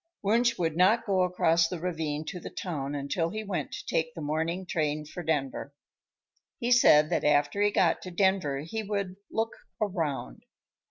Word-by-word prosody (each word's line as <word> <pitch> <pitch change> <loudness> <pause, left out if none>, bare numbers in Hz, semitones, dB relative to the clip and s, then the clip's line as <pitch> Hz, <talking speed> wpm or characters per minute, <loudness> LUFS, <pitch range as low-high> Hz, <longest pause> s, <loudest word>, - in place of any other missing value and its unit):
Wunsch 235 +3 +3
would 165 -3 0
not 190 +7 +4
go 195 -3 +2
across 170 -2 +3
the 175 0 -5
ravine 160 -3 -3
to 180 +2 -5
the - - -7
town 145 -6 -4
until 145 +4 -1
he 215 +4 -4
went 195 -4 -3
to - - -6
take 160 0 -1
the - - -6
morning 160 +5 -2
train 155 -3 -1
for 165 +4 -7
Denver. 140 -3 -2 0.8
He 240 -1 -2
said 150 -11 +6
that - - +1
after 145 +5 +2
he 205 - +4
got 175 -5 +2
to 185 - -7
Denver 180 -7 +1
he 195 +9 -4
would 200 -3 -3
"look 225 0 -1 0.3
around." 155 - -2
170 Hz, 175 wpm, -28 LUFS, 150-195 Hz, 0.8 s, said